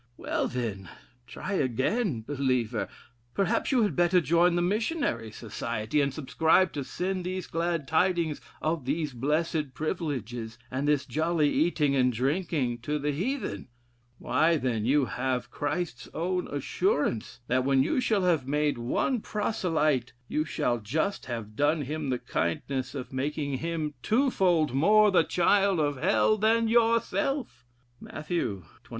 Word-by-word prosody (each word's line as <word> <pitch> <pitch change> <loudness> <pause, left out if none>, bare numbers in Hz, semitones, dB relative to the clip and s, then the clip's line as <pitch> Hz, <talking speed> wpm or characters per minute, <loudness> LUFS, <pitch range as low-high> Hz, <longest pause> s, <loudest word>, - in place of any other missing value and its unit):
Well, - - -1
then! 105 -7 -4 0.4
try 200 - -5
again, 135 - 0
believer: 125 -4 -1 0.5
perhaps 195 +6 +1
you 250 -4 +4
had 205 - 0
better 175 +1 +4
join 170 +1 +3
the 175 - +2
Missionary 220 - -1
Society, 110 +3 -2
and 140 0 +1
subscribe 160 +5 +2
to 145 - -3
send 185 +6 -3
these 185 0 -3
glad 165 -3 -2
tidings 170 -2 +1 0.2
of 155 -3 -1
these 150 +1 -1
blessed 150 +2 -1
privileges, 125 - -3
and 135 +3 -1
this 145 -1 +2
jolly 155 -1 +1
eating 150 -4 +2
and 125 -1 +3
drinking, 135 0 -1
to 145 +5 -2
the 150 0 -1
Heathen. 240 - -3 0.5
Why, 160 +6 +2
then; 120 -6 -1
you 140 +2 +3
have 125 0 -2
Christ's 145 -1 -3
own 180 +2 -1
assurance, 145 - -1
that 130 +1 +1
when 135 0 +3
you 165 - +1
shall 220 -6 +1
have 165 -8 +2
made 150 -2 0
one 210 - 0
proselyte, 160 - 0
you 155 +4 -1
shall 125 -6 -1
just 155 - -2
have 115 -3 -5
done 145 +4 +2
him 150 +1 -3
the 125 - +1
kindness 130 - -2
of 130 -1 -6
making 140 0 -2
him 160 -2 -2
twofold 190 - +2
more 210 +9 +5
the 185 - +5
child 195 +1 +2
of 145 -2 0
Hell 205 +4 +3
than 225 +2 +3
yourself. 230 - +1 0.3
Mat. 155 - -9
xxiii. 110 - -2
150 Hz, 145 wpm, -28 LUFS, 130-180 Hz, 0.5 s, more